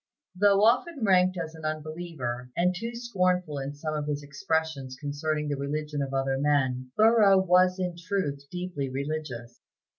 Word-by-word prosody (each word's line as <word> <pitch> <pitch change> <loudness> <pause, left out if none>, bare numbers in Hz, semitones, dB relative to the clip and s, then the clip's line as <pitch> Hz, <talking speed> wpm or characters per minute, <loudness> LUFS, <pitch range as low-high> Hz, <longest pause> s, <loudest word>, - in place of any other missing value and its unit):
Though 200 +1 +4
often 250 +5 +2
ranked 185 -2 +4
as 165 -2 -4
an 160 -1 -12
unbeliever, 155 -5 -4
and 180 +1 +3
too 230 +6 -5
scornful 180 - 0
in 135 +1 -5
some 155 +1 -4
of 150 -1 -3
his 145 -1 -2
expressions 145 -2 -2
concerning 150 +1 -2
the 145 -1 -2
religion 150 +1 -3
of 135 -1 -3
other 135 0 0
men, 130 -3 +1
Thoreau 215 -3 +6
was 185 0 +4
in 180 -2 -2
truth 170 -6 -3
deeply 180 -6 -4
religious. 135 -4 -5
155 Hz, 155 wpm, -27 LUFS, 140-185 Hz, -, Thoreau